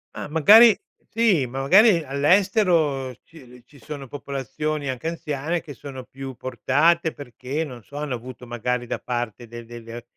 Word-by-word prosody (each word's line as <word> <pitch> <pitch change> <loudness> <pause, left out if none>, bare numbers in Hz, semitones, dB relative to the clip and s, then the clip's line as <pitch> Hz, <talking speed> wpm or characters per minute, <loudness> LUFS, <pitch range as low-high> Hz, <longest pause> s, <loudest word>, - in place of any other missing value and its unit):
Ah, - - -5
magari 210 +9 +7 0.4
sì, 210 - +3
ma 130 +2 -5
magari 185 +4 +5
all'estero 150 - +2
ci 160 -5 -16
l 125 -1 -16
ci 140 - -19
sono 145 -3 -8
popolazioni 140 +2 -4
anche 130 +5 -4
anziane 165 0 -3
che 145 - -10
sono 130 0 -9
più 135 +1 -8
portate 150 +7 +1
perché, 140 +3 -5
non 125 -6 -9
so, 140 - -15
hanno 150 -4 -3
avuto 125 +1 -10
magari 120 +1 -2
da - - -2
parte 120 -1 -4
del 120 +1 -9
del 120 0 -10
del 115 +1 -9
140 Hz, 165 wpm, -23 LUFS, 125-160 Hz, 0.4 s, magari